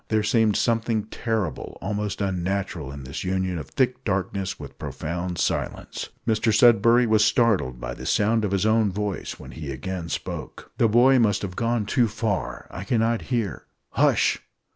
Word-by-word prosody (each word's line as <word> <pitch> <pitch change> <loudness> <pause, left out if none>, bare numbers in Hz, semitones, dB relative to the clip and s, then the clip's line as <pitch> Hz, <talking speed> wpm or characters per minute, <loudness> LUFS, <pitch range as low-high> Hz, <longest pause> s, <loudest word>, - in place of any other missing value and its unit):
There 110 -1 +1
seemed 110 -1 +3
something 115 -2 +1
terrible, 110 -5 -3
almost 105 +2 -3
unnatural, 95 -5 -2
in 70 -1 -8
this 65 +2 -6
union 95 -1 -1
of 70 - -8
thick 125 0 0
darkness 95 -1 -2
with - - -10
profound 90 +2 -4
silence. - - -2 0.2
Mr 110 0 +2
Sudberry 115 +2 +5
was 110 -1 +4
startled 110 - +2
by - - -5
the - - -7
sound 110 +2 +2
of 105 - +1
his 100 +1 0
own 110 -2 +3
voice 105 0 -4
when 65 - -10
he 75 +3 -7
again 85 +6 -5
spoke. - - -6
"The 115 - +5
boy 125 +4 +5
must 105 -4 +2
have 90 -2 -4
gone 115 0 0
too 120 +3 +2
far. 110 -2 -3
I - - -6
cannot 115 -2 +1
hear 115 -6 -2
" - - -51
"Hush!" - - +2
105 Hz, 170 wpm, -24 LUFS, 95-115 Hz, 0.2 s, Sudberry